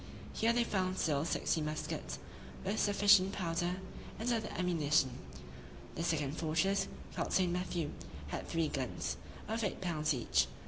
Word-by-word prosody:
Here 225 +1 +3
they 235 0 +3
found 185 -4 0
still 150 -3 +1
sixty 165 -1 +1
muskets, 65 - -3 0.5
with 205 +3 0
sufficient 200 -1 +5
powder 175 0 0 0.4
and 235 +3 0
other 220 -2 -1
ammunition. 160 -6 +3 0.8
The - - -4
second 150 -4 0
fortress, 165 +5 +2 0.3
called - - -1
St. 180 -2 +3
Matthew, 175 -3 -1 0.4
had - - -4
three 165 -2 +1
guns, 130 -3 -2 0.3
of 225 +1 -1
eight 200 - -1
pounds 155 -5 0
each. 90 - +2
175 Hz, 140 wpm, -34 LUFS, 155-195 Hz, 0.8 s, sufficient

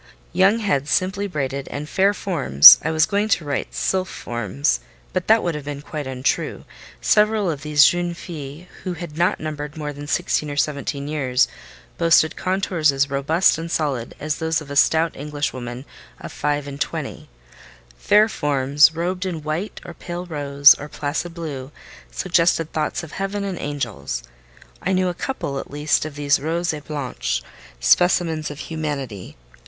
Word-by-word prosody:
Young 195 +4 +4
heads 165 -11 -1
simply 190 +2 0
braided, 140 -5 -3
and 150 +1 -6
fair 195 +5 +3
forms 140 - +8
(I 160 - -2
was 160 0 +3
going 205 +5 0
to 165 - -12
write 140 -2 -3
sylph 185 -1 0
forms, 90 - -2 0.3
but - - -2
that 220 +1 +5
would 175 - -1
have 150 -2 -6
been 145 0 -6
quite 150 -2 -6
untrue: 130 0 -2 0.4
several 210 - +3
of 145 -3 -6
these 150 -1 +5
"jeunes 175 -1 +1
filles," 155 -2 -8 0.2
who 185 -2 -4
had 170 -3 -8
not 175 +3 +1
numbered 150 -1 -6
more 150 -1 -4
than 145 +1 -9
sixteen 155 -2 0
or 145 - -5
seventeen 140 -1 -2
years, 135 -4 +1 0.5
boasted 165 -2 +4
contours 185 -5 +1
as 140 0 0
robust 155 +6 +2
and 165 +1 -5
solid 140 -8 -2
as 150 0 -2
those 160 0 0
of 145 -2 -10
a - - -4
stout 160 +3 +3
Englishwoman 135 -4 -4 0.3
of - - -8
five 145 -1 -1
and 140 0 -8
twenty)—fair - - -2
forms 145 -3 +3
robed 180 +3 -2
in 170 -5 -4
white, 155 +7 -4
or 170 - -8
pale 175 +1 -6
rose, 145 -3 +5
or 150 - -7
placid 160 +4 -4
blue, 145 -5 -6 0.4
suggested 170 -2 +1
thoughts 155 +2 -2
of 160 - -9
heaven 195 +1 -3
and 195 -3 -4
angels. 120 - -4 0.6
I 190 - 0
knew 185 -1 +2
a - - -3
couple, 170 - -4
at - - -8
least, 145 +1 0
of 155 -2 -7
these 145 -1 +2
"rose 165 +4 -1
et 150 -1 -8
blanche" 60 - -3 0.4
specimens 160 - +2
of 145 - -8
humanity. 140 - -5
150 Hz, 165 wpm, -21 LUFS, 140-175 Hz, 0.6 s, forms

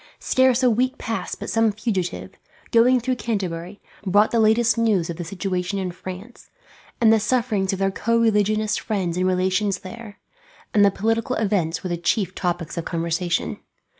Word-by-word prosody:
Scarce 260 -1 +2
a 250 - +6
week 255 +4 0
passed 225 -1 -4
but - - -5
some 225 -1 +3
fugitive, 185 - -3 0.4
going 245 +2 +5
through 255 +1 -1
Canterbury, 190 -4 -4 0.2
brought 205 +2 +3
the 235 - +2
latest 225 +2 +4
news 210 -8 +1
of 165 - -8
the 175 - -4
situation 185 +1 -3
in 185 -2 -2
France, 185 +6 -10 0.5
and 225 -2 +5
the 220 - +4
sufferings 215 -4 0
of 195 - -2
their 195 0 +1
co 230 +4 0
religionist 215 -1 +2
friends 190 -6 -2
and 185 +1 +1
relations 185 +1 0
there; 210 +1 -10 0.6
and 205 - +5
the 200 - +6
political 225 +5 -1
events 195 -6 0
were 185 - -3
the 175 - -1
chief 180 +2 0
topics 175 -2 -3
of 165 - -5
conversation. 170 +1 -2
205 Hz, 170 wpm, -22 LUFS, 180-225 Hz, 0.6 s, a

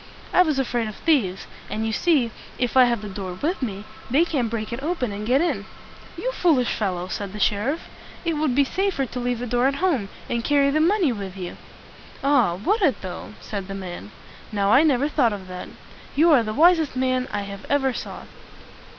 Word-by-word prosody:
"I - - +6
was 310 -6 +2
afraid 245 -4 0
of 215 - -6
thieves; 220 - +1 0.2
and 220 +1 -2
you 220 - -1
see, 275 -5 +2 0.3
if 245 0 -1
I 255 -1 +8
have 235 -3 0
the - - -5
door 190 -2 -5
with 335 +4 -1
me, 205 -5 -3 0.3
they 290 +8 +4
can't 270 -9 -1
break 220 0 -3
it 240 - -4
open 295 -7 -1
and 210 +1 -5
get 260 +4 +4
in." 345 - -1 0.5
"You - - -2
foolish 310 - +2
fellow!" 180 -4 -2
said 200 +1 -5
the 210 - -6
sheriff. 215 +11 +1 0.4
"It 335 - +1
would 300 -4 0
be 280 - +5
safer 370 -1 0
to 250 - -6
leave 245 0 -1
the 245 - -4
door 245 +2 +2
at 275 - 0
home, 280 - 0 0.2
and 235 -1 -1
carry 280 0 +3
the 305 - +2
money 350 -3 +3
with 195 -4 -6
you." 180 -2 -6 0.7
"Ah, 255 -11 +3
would 400 - 0
it, 295 -9 +2
though?" 185 +3 -7
said 200 -3 -5
the 195 - -5
man. 190 +1 -7 0.4
"Now, 200 -1 +1
I 265 - +7
never 285 -3 +3
thought 240 -7 +2
of 190 -2 -7
that. 180 0 -7 0.5
You 325 +4 +5
are 275 -6 +6
the 215 -1 -3
wisest 320 +2 +4
man 255 0 +1
that - - -7
I 200 0 -4
ever 270 -2 +2
saw." - - -6
245 Hz, 210 wpm, -23 LUFS, 210-295 Hz, 0.7 s, I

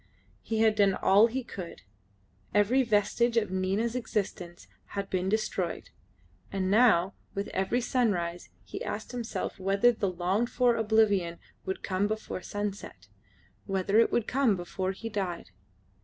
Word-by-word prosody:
He 220 -1 -1
had 220 -1 +5
done 200 -3 +3
all 200 +4 +5
he 255 +3 -3
could. 185 -7 -8 0.7
Every 210 +6 +4
vestige 235 +1 +2
of 210 -4 +1
Nina's 195 +5 0
existence 190 -7 -3 0.3
had 200 0 -3
been 185 0 0
destroyed; 195 -5 -2 0.6
and 190 -1 -1
now 200 -5 +4 0.2
with 200 +1 -3
every 195 +6 0
sunrise 185 -9 -1
he 95 - -7
asked 215 +3 -5
himself 240 -5 -4
whether 195 +5 +3
the 215 -4 -1
longed 185 +6 0
for 245 -2 +3
oblivion 210 -6 +2 0.3
would 190 - -3
come 190 +2 0
before 215 -3 -4
sunset, 205 +1 -6 0.6
whether 195 +2 +2
it 230 - +4
would 235 - +1
come 260 -5 +2
before 185 +1 -3
he 210 +4 -7
died? 185 - -4
205 Hz, 140 wpm, -29 LUFS, 185-225 Hz, 0.7 s, had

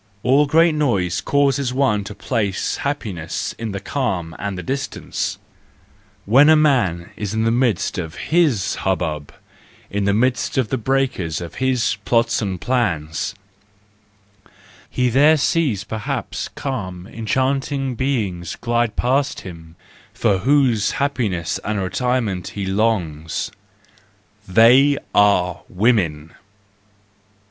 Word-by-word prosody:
All 140 +4 +4
great 165 +2 +4
noise 100 - 0
causes 140 -2 +1
one 130 -7 +2
to 105 - -8
place 105 -7 -1
happiness 100 - -3
in 115 -2 -3
the 100 - -4
calm 95 - -2
and 100 -1 -3
the 90 - -5
distance. 135 +6 -3 0.9
When 135 +8 +6
a 160 - +7
man 120 - +2
is 105 0 -4
in 110 - +1
the 115 - +2
midst 120 -7 0
of 80 -3 -5
his 145 - +1
hubbub, 80 -6 -2 0.6
in 100 0 -1
the 100 - +2
midst 125 +2 0
of 125 -5 +1
the 130 - 0
breakers 125 - -1
of 85 -1 -7
his 130 -5 +1
plots 115 0 +2
and 95 -4 -3
plans, 95 -6 -1 1.5
he 125 -1 +1
there 145 +6 +5
sees 140 - +1
perhaps 110 -1 -4
calm, 95 -10 -5
enchanting 130 +5 -1
beings 105 - -2
glide 120 -2 0
past 135 +3 0
him, 85 -3 -11 0.4
for 95 -2 +2
whose 130 -2 +2
happiness 115 - -1
and 105 -1 -2
retirement 105 -1 -1
he 100 - -2
longs 95 -7 -1 1.0
—they 125 +8 +6 0.2
are 90 -4 +3
women 90 -7 +1
110 Hz, 120 wpm, -20 LUFS, 95-130 Hz, 1.5 s, a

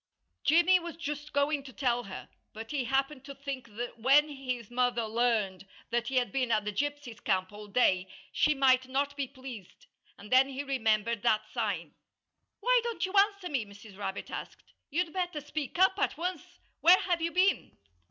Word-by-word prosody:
Jimmy 345 +4 +5
was 340 -1 -7
just 295 -2 -5
going 285 +1 +1
to 270 -1 -11
tell 245 -2 0
her. 190 -1 -8 0.3
But 225 +1 -8
he 275 -4 -1
happened 270 +2 0
to 280 0 -8
think 275 -3 -6
that 240 0 -5
when 280 +6 +5
his 255 -5 -5
mother 245 -1 +1
learned 215 -5 0 0.2
that 240 0 0
he 270 - -3
had 250 -1 +2
been 255 -3 0
at 215 -2 +2
the 210 - -2
gypsies' 285 -1 -3
camp 185 -2 0
all 210 0 -10
day 190 -4 +2 0.2
she 300 - +2
might 260 -1 +4
not 280 +2 -1
be 280 -2 -2
pleased. 255 -8 -11 0.3
And 210 - -13
then 260 +1 +6
he 275 +1 -4
remembered 230 -5 0
that 215 +1 +2
sign. - - -2 0.7
"Why - - +4
don't 470 -4 -2
you 375 - -7
answer 400 -2 +3
me?" 270 -6 0
Mrs. 200 0 -14
Rabbit 200 -1 -5
asked. - - -8 0.2
"You'd 325 +2 -1
better 360 -4 -2
speak 295 0 -5
up 380 +2 +4
at - - 0
once. 360 +1 -5 0.2
Where 355 +2 +7
have 350 -2 0
you 335 +1 0
been?" 375 +3 +1
270 Hz, 185 wpm, -30 LUFS, 230-300 Hz, 0.7 s, Where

